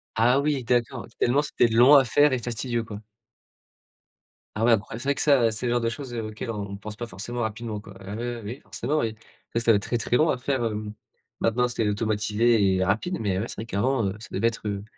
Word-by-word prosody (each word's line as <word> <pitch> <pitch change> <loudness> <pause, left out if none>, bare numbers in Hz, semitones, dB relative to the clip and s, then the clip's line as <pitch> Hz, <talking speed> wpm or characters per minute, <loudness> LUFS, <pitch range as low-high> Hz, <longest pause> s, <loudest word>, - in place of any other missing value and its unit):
Ah 125 +5 +4
oui 145 -3 0
d'accord, 120 +1 0
tellement 135 +4 +3
c'était 135 -4 +2
long 125 +6 +7
à 135 - +7
faire 145 +3 +4
et 125 - 0
fastidieux 120 0 -2
quoi? 105 -1 -8 1.5
Ah 110 +2 +1
ouais 120 - +6
incroya 110 +2 -2
c'est 130 - -7
vrai 140 - +2
que - - -1
ça, 135 -6 +4
c'est 110 +3 -3
le 120 - +1
genre 120 - +2
de 115 - 0
choses, 120 +2 -5
heu, 115 -2 -3
auxquelles 110 +2 -5
on 100 -2 -5
pense 105 +1 -8
pas 120 - -5
forcément 120 +6 -5
rapidement 110 -1 -3
quoi. 100 -1 -12
Ah 100 +2 -7
oui, 120 +1 -3
oui, 115 - -8
oui, 120 +7 -6
forcément 150 +6 -2
oui, 110 -1 -1 0.4
ça 115 - +1
ça 115 - +4
doit 105 - +5
être 100 - -5
très, 120 - -1
très 120 +2 +1
long 155 +1 +3
à - - +1
faire, 130 -2 -1
hem. 105 -1 -3 0.5
Maintenant, 125 +2 +1
c'est 115 -3 -1
automatisé 105 -1 +2
et 95 - +1
rapide, 110 - 0
mais 95 -3 0
ouais, 110 - -2
c'est - - -4
vrai 110 - -6
qu'avant, 115 0 0
ça - - -10
devait 110 +5 +1
être, 110 -2 -3
heu 100 -1 -3
115 Hz, 245 wpm, -25 LUFS, 105-125 Hz, 1.5 s, long